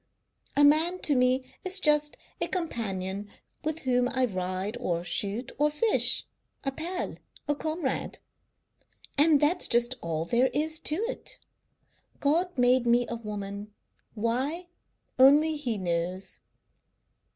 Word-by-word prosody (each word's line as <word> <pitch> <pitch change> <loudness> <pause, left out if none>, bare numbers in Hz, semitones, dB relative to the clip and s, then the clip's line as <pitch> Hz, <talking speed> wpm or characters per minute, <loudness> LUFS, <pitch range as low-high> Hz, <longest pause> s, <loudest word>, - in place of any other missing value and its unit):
A 290 - +6
man 315 +5 +4
to 295 - +2
me 255 +1 +3 0.2
is 375 +1 0
just 300 -3 +2 0.2
a - - +2
companion 205 - -3 0.3
with 315 +1 -2
whom 250 -1 +1
I 260 0 +1
ride 185 0 -3
or 175 -8 -1
shoot 205 +6 -2
or 300 +1 +4
fish; 420 +10 +3 0.4
a 275 - -1
pal, 340 +7 -4 0.3
a 290 - +2
comrade, 310 -1 -3 1.0
and 295 0 +5
that's 315 +5 +3
just 240 +1 +2
all 165 -1 -2
there 245 +7 +2
is 315 +1 +2
to 305 - +2
it. - - -5 0.8
God 330 +4 +1
made 245 0 +3
me 240 +1 +4
a 235 - -3
woman. 205 -2 -7 0.4
Why, 265 +11 -2 0.5
only 295 +4 +6
He 250 -7 -2
knows." 180 +1 -3
255 Hz, 130 wpm, -28 LUFS, 210-305 Hz, 1.0 s, A